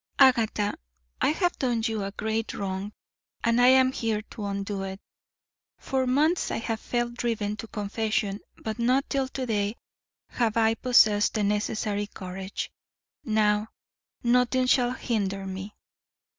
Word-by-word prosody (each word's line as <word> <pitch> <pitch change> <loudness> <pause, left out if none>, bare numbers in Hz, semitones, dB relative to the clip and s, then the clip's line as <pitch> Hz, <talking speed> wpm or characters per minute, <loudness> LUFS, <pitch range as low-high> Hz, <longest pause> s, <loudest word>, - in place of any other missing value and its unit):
"Agatha, 225 -6 +4 0.5
I - - +4
have 350 +3 0
done 240 -4 0
you 220 -3 -1
a 195 - -3
great 220 +2 -2
wrong 195 +1 -3 0.5
and 230 +1 +3
I 245 - +7
am 260 0 +6
here 225 -4 -1
to 215 -3 -6
undo 200 0 -3
it. 190 0 -5 0.8
For 260 -1 -1
months 305 +7 +2
I - - -1
have 225 0 -2
felt 240 0 -2
driven 225 -3 -1
to 225 - -7
confession, 210 -1 -1 0.2
but 220 +1 -5
not 255 +4 +2
till 270 -1 +1
to 260 0 -4
day 210 -2 0 0.6
have 230 -2 0
I 225 0 +4
possessed 220 -4 +4
the 215 - +1
necessary 205 0 -1
courage. 190 0 -6 0.5
NOW, 215 -2 +2 0.6
nothing 250 +1 +3
shall 250 -1 +3
hinder 200 -6 -2
me." 190 +2 -6
220 Hz, 145 wpm, -27 LUFS, 205-245 Hz, 0.8 s, I